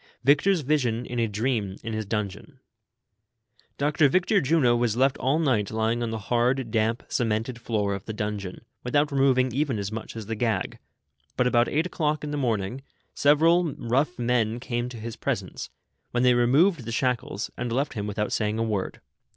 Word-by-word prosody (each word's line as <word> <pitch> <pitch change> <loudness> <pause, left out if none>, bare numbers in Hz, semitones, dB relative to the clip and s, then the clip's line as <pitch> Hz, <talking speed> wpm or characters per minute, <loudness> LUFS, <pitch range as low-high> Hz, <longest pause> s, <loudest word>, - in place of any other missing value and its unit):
VICTOR'S 155 +7 +4
VISION, 125 -5 0
IN 120 - -4
A 115 - +2
DREAM, 105 -2 -1
IN 115 - -4
HIS 110 -2 -3
DUNGEON, 105 -2 -4 1.2
jjOCTOE 145 0 +3
VICTOPt 185 +4 +2
JUNO 130 -5 +3
was 120 -2 0
left 135 +1 +3
all 135 +4 +1
night 130 -11 +1
lying 110 +2 0
on 120 - -1
the 110 - -3
hard, 120 +3 0
damp, 115 +1 0
cemented 115 +1 -1
floor 105 -4 -1
of 100 0 -6
the - - -5
dun 105 -1 -2
geon, 95 -2 -8 0.2
without 145 +4 +1
removing 130 -2 +3
even 140 -3 0
as 100 0 -3
much 110 +1 -6
as 110 -2 -6
the 115 +2 -3
^gag; 115 0 -1 0.6
but, 125 - +3
about 120 -1 +3
eight 155 +3 +1
o'clock 155 -4 -1
in 150 - -4
tlie 150 - -2
morning, 115 -1 -1 0.3
several 160 +2 +3
rough 135 +9 0
men 120 -2 0
came 120 -1 -3
to 125 - -9
his 115 +1 -6
presence, - - -4 0.4
when 120 0 0
they 125 -1 +5
re 120 0 +3
moved 155 - +3
the 115 - -4
shackles, 120 -4 -1
and 120 -1 -4
left 135 +5 -1
him 105 -3 -4
without 105 +1 -2
saying 105 0 0
a 115 - 0
word. 105 -4 -3
120 Hz, 190 wpm, -26 LUFS, 110-140 Hz, 1.2 s, they